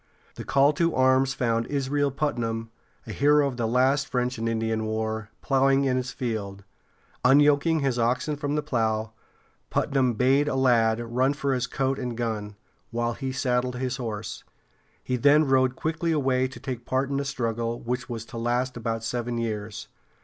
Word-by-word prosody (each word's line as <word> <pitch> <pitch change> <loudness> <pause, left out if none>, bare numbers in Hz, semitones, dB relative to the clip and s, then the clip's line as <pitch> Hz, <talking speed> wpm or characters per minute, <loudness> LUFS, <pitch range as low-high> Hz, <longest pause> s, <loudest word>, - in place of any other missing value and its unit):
The - - -7
call 140 +2 +3
to 170 +1 +1
arms 130 +1 +3
found 115 -3 0
Israel 145 0 0
Putnam 115 -6 -2 0.3
a - - -7
hero 145 0 +4
of 130 -3 -5
the 115 -2 0
last 130 +3 +2
French 125 -2 -1
and 115 0 -1
Indian 110 -1 -1
War 110 -1 -3
plowing 135 0 +3
in 130 -1 +1
his 130 0 -2
field. 100 -6 -4 0.6
Unyoking 145 +4 +4
his 135 -3 0
oxen 125 +6 0
from 145 0 -2
the 150 - 0
plow, 110 -5 -1 0.6
Putnam 130 -3 +1
bade 135 +5 +3
a 145 - 0
lad 115 -4 +3
run 125 +4 +1
for 140 -2 -1
his 125 -2 -1
coat 135 0 -1
and 125 -3 -4
gun, 110 -3 -3 0.3
while 120 0 -1
he 135 +1 -4
saddled 125 -1 0
his 125 0 -2
horse. 110 -4 -5 0.6
He 125 - -1
then 145 +4 +5
rode 130 -1 +2
quickly 165 +3 -1
away 130 -4 +1
to 130 - -11
take 130 -4 -5
part 130 +1 0
in 140 - 0
the 140 - 0
struggle, 120 -3 -2
which 125 +2 -4
was 115 -2 -5
to 115 -1 -7
last 120 +2 0
about 115 -1 -3
seven 120 +1 -2
years. 110 -2 -4
125 Hz, 175 wpm, -26 LUFS, 115-135 Hz, 0.6 s, then